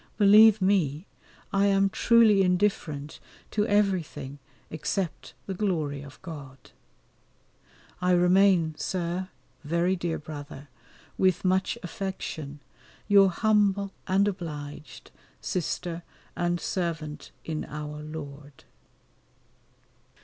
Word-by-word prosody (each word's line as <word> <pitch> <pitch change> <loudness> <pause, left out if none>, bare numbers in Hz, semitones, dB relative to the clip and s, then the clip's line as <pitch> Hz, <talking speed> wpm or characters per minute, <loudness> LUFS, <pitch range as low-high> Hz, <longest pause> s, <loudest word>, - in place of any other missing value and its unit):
Believe 210 0 +7
me, 175 -5 +1 0.5
I 200 0 +3
am 195 0 +3
truly 225 -4 +5
indifferent 180 -6 0 0.3
to 210 0 0
everything 170 - 0 0.3
except 170 +2 -3
the 195 - -4
glory 160 -8 -1
of 145 0 -12
God. 140 -7 -10 1.3
I 180 - +1
remain, 180 -2 +4
Sir, 180 +1 -2 0.3
very 170 +4 +1
dear 175 -2 -2
brother, 145 -2 -9 0.5
with 185 -1 +2
much 190 +4 +1
affection, 160 -6 -5 0.5
Your 200 -2 +6
humble 200 0 +2 0.2
and 195 +2 +3
obliged 150 -6 -7 0.3
Sister 175 -1 -3 0.3
and 175 0 0
servant 165 -5 -4 0.2
in 155 -1 -3
Our 150 0 -6
Lord. 145 -2 -9
175 Hz, 95 wpm, -27 LUFS, 150-195 Hz, 1.3 s, Believe